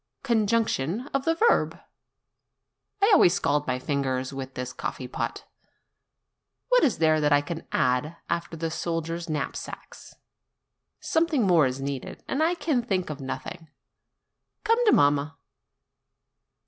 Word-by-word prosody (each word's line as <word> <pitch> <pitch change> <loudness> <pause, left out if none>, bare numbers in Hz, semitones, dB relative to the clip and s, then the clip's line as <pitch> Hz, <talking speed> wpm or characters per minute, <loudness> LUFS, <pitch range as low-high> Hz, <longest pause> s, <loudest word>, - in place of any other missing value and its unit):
Conjugation 220 - 0
of 275 -1 0
the 330 - +2
verb! 460 +7 +2 1.3
I 415 - +5
always 175 - +6
scald 145 +1 0
my 130 -1 0
fingers 130 -1 -2
with 135 -1 -7
this 125 0 -5
coffee 125 - -5
pot. - - -4 1.3
What - - +5
is 255 - +2
there 155 -1 +3
that 150 0 +2
I 145 0 +5
can 160 +3 -7
add 130 +6 0
after 170 -1 -3
the 165 0 -3
soldiers' 165 0 -3
knapsacks? 155 -1 -6 0.8
Something 320 -7 +1
more 170 -7 +5
is 130 +1 -4
needed, 135 -1 -5
and 275 - -1
I 335 +3 +2
can 305 -7 0
think 190 -8 -2
of 145 -1 -7
nothing. 160 +5 -6 0.9
Come 460 +2 +3
to - - +7
mamma.' 145 +1 +3
165 Hz, 135 wpm, -26 LUFS, 140-230 Hz, 1.3 s, to